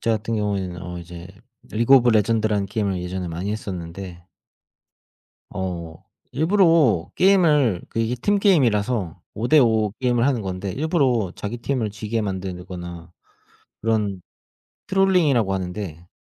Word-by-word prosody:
저 115 - 0
같은 110 +1 -2
경우에는 95 -4 -2
어 90 0 -6
이제 85 +1 -10 0.4
리그 115 +5 +4
오브 125 -2 +5
레전드라는 110 -2 +2
게임을 100 -3 -2
예전에 90 0 -4
많이 90 +5 -3
했었는데 90 -3 -7 1.3
어. 85 -4 -5 0.3
일부러 160 - +3
게임을 150 - +3
그 115 - -4
이게 115 +2 0
팀 205 +12 +1
게임이라서 115 - +1
5 115 +3 -2
대 155 +2 +6
5 110 -4 +3
게임을 120 -2 +2
하는 130 -5 0
건데 95 0 -4
일부러 135 - +1
자기 105 +4 -5
팀을 120 -4 -2
지게 110 +2 -3
만들거나 90 -3 -6 0.7
그런 105 -5 0 0.6
트롤링이라고 175 - +3
하는데 90 -2 -5
105 Hz, 290 characters per minute, -22 LUFS, 90-125 Hz, 1.3 s, 대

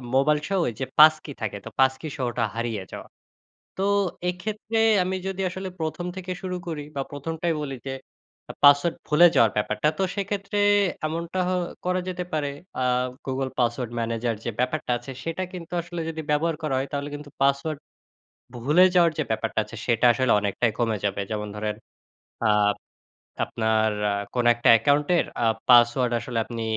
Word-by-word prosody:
মোবাইলসহ 150 +6 +2
ওই - - -1
যে - - 0
পাসকি 155 -1 +6
থাকে, 105 -2 -3
তো - - -6
পাসকি 130 +3 +2
সহটা 120 -2 -1
হারিয়ে 115 -4 -2
যাওয়া। - - -8 0.7
তো, 190 - -1 0.5
এক্ষেত্রে 215 +5 -4 0.3
আমি 185 +1 -2
যদি 195 0 -3
আসলে 190 +1 -5
১ম 160 +2 -3
থেকে 185 -1 -6
শুরু 185 -1 -3
করি 155 -3 -4
বা 140 - -1
১ম 145 +3 -5
টাই 170 -1 +1
বলি, 135 -2 -4
যে - - -2 0.7
পাসওয়ার্ড 145 +4 +6
ভুলে 155 +3 +6
যাওয়ার 115 -2 +5
ব্যাপারটা, 105 +3 0
তো 195 - +1
সেক্ষেত্রে 200 0 -3 0.5
এমনটা 170 +3 -3
হ - - 0 0.3
করা 180 0 +1
যেতে 180 -1 -3
পারে, 150 -2 0 0.3
আ - - -1 0.4
Google 130 0 -2
Password 120 0 0
Manager 115 +1 -1
যে - - 0
ব্যাপারটা 125 +2 -1
আছে, 120 +3 -9
সেটা 165 +3 -3
কিন্তু 175 -1 -8
আসলে 175 0 -6
যদি 160 0 -5
ব্যবহার 160 +2 +1
করা 145 -4 0
হয়, 135 - -3
তাহলে 140 +1 -3
কিন্তু 145 0 -9
পাসওয়ার্ড 140 +2 +1 0.8
ভুলে 150 +10 +4
যাওয়ার 170 -2 +5
যে - - +2
ব্যাপারটা 110 0 -1
আছে, 115 - -11
সেটা 115 0 +1
আসলে 130 -1 +2
অনেকটাই 105 +3 0
কমে 115 -2 +1
যাবে। 100 0 0
যেমন 105 -1 -3
ধরেন, 105 0 -3 0.9
আপ 105 - +1 0.7
আপনার 110 -1 +1 0.2
আ - - +1 0.2
কোনো 120 -1 +2
একটা 120 - +1
অ্যাকাউন্টের 145 +9 +3 0.2
আ - - +3 0.2
পাসওয়ার্ড 120 0 +5
আসলে 115 0 -4
আপনি 115 -1 -5
140 Hz, 165 wpm, -25 LUFS, 120-170 Hz, 0.9 s, পাসকি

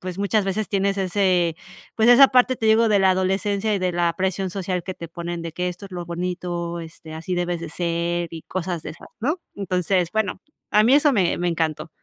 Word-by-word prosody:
pues, 185 0 -6
muchas 200 +1 +1
veces 205 +2 -1
tienes 200 0 0
ese 180 -3 +1 0.4
pues, 225 +1 +4
esa 270 +3 +9
parte, 255 0 +3
te 220 - -2
digo, 220 +1 +5
de 205 -2 +4
la 190 -1 +5
adolescencia 200 +3 0
y - - 0
de 185 -1 +1
la 170 -1 +1
presión 190 0 -1
social 185 -1 -3
que 185 - -5
te 170 -2 -8
ponen, 170 0 -5
de 165 -1 -6
que 180 +2 -2
esto 180 +3 -7
es - - -18
lo 175 -1 -5
bonito, 175 0 -3
este, 160 -1 -10
así 175 +3 -4
debes 175 -1 -1
de 165 -2 -6
ser 170 0 -1
y 160 - -7
cosas 175 -3 -4
de - - -6
esas, 155 - -13
¿no? 310 +9 -1 0.2
Entonces, 180 -2 0
bueno, 210 -3 -1 0.3
a 210 +1 +5
mí 250 - +5
eso 295 0 +5
me 190 -7 +1
me 175 0 0
encantó. 165 -1 -2
185 Hz, 225 wpm, -23 LUFS, 170-200 Hz, 0.4 s, esa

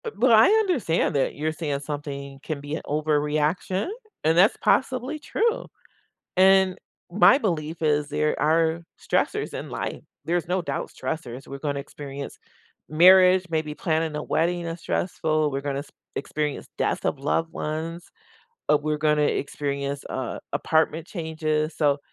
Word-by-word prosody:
Bu 455 - -3
but 250 0 +3
I 220 -1 +8
understand 365 - +2
that 135 - +1
you're 155 +2 -1
saying 150 -3 -3
something 140 -2 -6
can 155 -3 -4
be 145 +2 -4
an - - -5
overreaction, 150 +5 0 0.4
and 160 +2 +3
that's 195 +5 +5
possibly 260 +3 +1
true. 460 +10 -1 0.7
And 190 0 +5 0.3
my 210 +7 +6
belief 165 - -2
is 150 -2 +1
there 150 +1 0
are 160 +2 +2 0.2
stressors - - -1
in - - -5
life, - - -4 0.2
there's 175 0 0
no 180 +1 0
doubt 170 - -4
stressors, 135 -5 -5
we're 140 - -6
gonna 145 -1 -2
experience 140 0 -8 0.5
marriage, 185 +3 +6
maybe 155 -2 -1
planning 160 -2 -1
a 150 - -3
wedding 175 +2 0
is 165 +1 -5
stressful, 155 -4 0
we're 135 0 -2
gonna 140 -1 -2
s 145 - -9 0.3
experience 150 0 -3
death - - -1
of 140 - 0
loved 160 +4 0
ones, 165 +3 -4 0.6
uh, 150 - +6
we're 150 0 -1
gonna 150 0 +2
experience, 140 -1 -2
uh, 130 -2 -4
apartment 160 +2 +1
changes, 155 -2 -2
so, 145 -2 +2
155 Hz, 150 wpm, -25 LUFS, 145-175 Hz, 0.7 s, I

